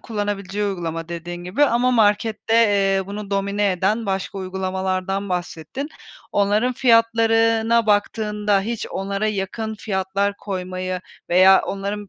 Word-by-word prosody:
kullanabileceği 205 -2 -3
uygulama 165 -4 -3
dediğin 175 +1 -6
gibi 210 +12 +2
ama 250 -1 +2
markette, 220 0 +2
eee, 195 -4 +3
bunu 205 0 -7
domine 200 0 +1
eden 200 +5 0
başka 195 0 -3
uygulamalardan 190 +1 -2
bahsettin. 180 - -4 0.4
Onların 205 +5 +2
fiyatlarına 230 -1 +3
baktığında 210 -1 +1
hiç 230 +3 -4
onlara 200 +2 -2
yakın 215 +2 -3
fiyatlar 200 0 -2
koymayı 185 -1 -4 0.3
veya 185 +2 +6
onların 200 +1 -4
200 Hz, 115 wpm, -21 LUFS, 190-220 Hz, 0.4 s, veya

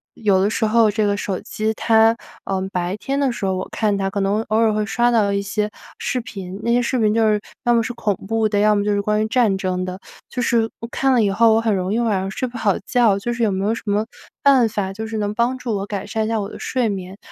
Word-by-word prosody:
有 200 -4 +2
的 195 - +3
时 215 - -1
候 220 0 +4
这 215 0 0
个 205 0 0
手 195 -2 -3
机 220 +1 -2
它， 225 0 +4 0.3
呃， 190 -1 -1
白 180 0 -2
天 275 +5 -2
的 275 -2 +2
时 205 -4 -3
候， 190 - 0
我 185 - -4
看 210 -2 0
它 195 0 -1
可 205 - -2
能 200 +3 +1
偶 215 - +2
尔 225 -1 +4
会 210 0 0
刷 240 +3 +2
到 215 -4 +2
一 200 - 0
些 210 +1 -2 0.3
视 250 - -2
频， 195 -4 -8
那 235 - 0
些 240 - +4
视 250 +1 0
频 215 -2 +3
就 225 -1 +3
是 210 -1 +2 0.2
要 240 -2 +3
么 230 - +4
是 230 - -3
恐 215 -3 -1
怖 225 0 +1
的， 205 -1 0
要 210 0 +4
么 205 - +1
就 210 - +1
是 200 - +1
关 210 +1 +1
于 - - -1
战 225 -4 +2
争 185 -2 -2
的， 185 0 -6 0.3
就 250 - -6
是 235 -2 +2
我 230 - -5
看 270 0 +1
了 240 -3 +4
以 200 - +2
后， 225 +2 +4
我 - - +4
很 225 -3 +1
容 185 0 -2
易 220 - +1
晚 235 -2 +1
上 190 - -3
睡 255 +6 -3
不 240 -1 -8
好 205 -4 +2
觉， 230 -5 +3
就 240 +4 -3
是 235 - -5
有 220 -3 +3
没 190 +1 -1
有 215 - +2
什 230 - -5
么 205 +1 +1 0.4
办 265 -5 +5
法， 200 -3 -3
就 220 +3 -5
是 220 0 -4
能 205 -1 -1
帮 240 +4 0
助 240 -4 -3
我 195 - -3
改 200 -1 -4
善 220 +1 -2
一 - - -2
下 225 0 0
我 200 - -3
的 - - -10
睡 250 -3 0
眠？ 190 -1 -5
215 Hz, 310 characters per minute, -20 LUFS, 200-230 Hz, 0.4 s, 办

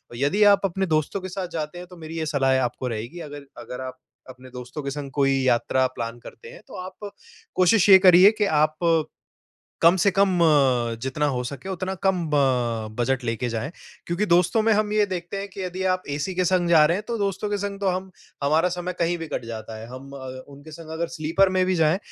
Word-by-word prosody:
यदि 145 - +2
आप 200 - -16
अपने 190 +1 -1
दोस्तों 155 +4 -1
के 185 - -6
साथ 185 0 -4
जाते 155 +1 -4
हैं, 180 - -9
तो 180 -1 -14
मेरी 160 0 -8
ये 160 - -2
सलाहे 135 -3 +2
आपको 125 0 -2
रहेगी, 115 +8 -5
अगर 145 -3 -9 0.2
अगर 125 - -7
आप 130 0 -7 0.3
अपने 130 0 -13
दोस्तों 125 +4 -8
के 140 - -3
संग 140 -1 -6
कोई 135 0 +3
यात्रा 130 +1 +2
प्लान 115 0 -5
करते 465 - -12
हैं, - - -13
तो 265 - -11
आप 200 +2 -9 0.4
कोशिश 190 +3 +4
ये 190 - +11
करिए 185 +1 +7
कि 210 - +2 0.2
आप 155 0 -8 1.1
कम 170 +2 +6
से 195 +2 +3
कम, 190 -2 +2
अ, 130 -7 +3
जितना 140 +3 -1
हो 130 -3 -1
सके, 140 +7 -7
उतना 190 0 -3
कम 185 -3 +1
अ, 125 -7 0
बजट 125 +2 0
लेके 115 +1 -2
जाएँ। 115 +5 -3 0.4
क्योंकि 175 +5 -1
दोस्तों 180 +5 +3
में 225 0 +3
हम 210 0 +1
ये 210 -1 +3
देखते 180 0 -5
हैं 200 +1 -5
कि 195 - -9
यदि 185 +1 -4
आप 185 0 -2
एसी 180 +6 -3
के 185 - +1
संग 180 -1 +1
जा 160 -3 +6
रहे 170 - +1
हैं, 205 - -5
तो 235 - -1
दोस्तों 200 0 -2
के 205 - -1
संग 200 0 -5
तो 200 - +1
हम 185 +1 -2 0.3
हमारा 155 +5 +3
समय 180 0 -4
कहीं 170 +1 +1
भी 165 - -5
कट - - -4
जाता 110 -1 -7
है। 110 - -9
हम 135 +2 -10
अ, 130 -1 -8 0.2
उनके 145 +3 -13
संग 160 0 -11
अगर 170 - 0
स्लीपर 165 +5 +2
में 185 - +3
भी 185 - +1
जाएँ, 165 +2 +3
165 Hz, 230 wpm, -24 LUFS, 135-185 Hz, 1.1 s, ये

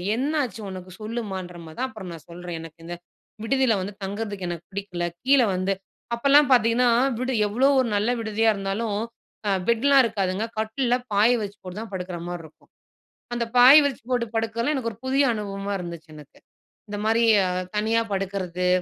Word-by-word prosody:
என்னாச்சு 265 -4 -1
உனக்கு 185 -1 -8
சொல்லுமான்ற 200 -6 -5
மாதான்." 160 +12 -4
அப்புறம் 210 -6 -9
நான் 165 -2 -10
சொல்றேன் 175 0 -6
எனக்கு 165 0 -12
இந்த 175 +1 -5 0.5
விடுதியில 260 +1 +2
வந்து 200 +3 -5
தங்குறதுக்கு 205 -1 -4
எனக்கு 170 -1 -6
பிடிக்கல. 195 -3 -4 0.2
கீழ 275 0 +6
வந்து 185 +2 0 0.4
அப்பலாம் 280 +3 +5
பார்த்தீங்கன்னா, 240 0 +4 0.3
விடு 255 +1 -1
எவ்வளோ 240 +7 +2
ஒரு 255 - +2
நல்ல 205 +3 +1
விடுதியா 225 0 +1
இருந்தாலும் 200 +2 -2 0.5
அ - - +2 0.2
பெட்லாம் 270 +4 +5
இருக்காதுங்க. 205 -3 -1
கட்டில்ல 230 +3 0 0.2
பாய 205 +3 +5
விரிச்சி 205 -1 -5
போட்டு 185 +2 -7
தான் 225 -2 -8
படுக்குற 180 -1 -4
மாதிரி 175 -1 -5
இருக்கும். 155 - -20 0.7
அந்த 240 0 0
பாய் 255 +4 +10
விரிச்சி 275 -5 -2
போட்டு 245 -2 +1
படுக்கறதல்லாம் 225 +5 0
எனக்கு 235 -3 -2
ஒரு 210 - -17
புதிய 275 +2 +3
அனுபவமா 200 -1 -4
இருந்துச்சு 170 -2 -8
எனக்கு. 150 -1 -14 0.5
இந்த 205 - -4
மாதிரி 225 +2 +3 0.2
அ - - -1 0.3
"தனியா 220 +2 +2
படுக்கிறது. 185 -2 -2
210 Hz, 165 wpm, -24 LUFS, 185-235 Hz, 0.7 s, பாய்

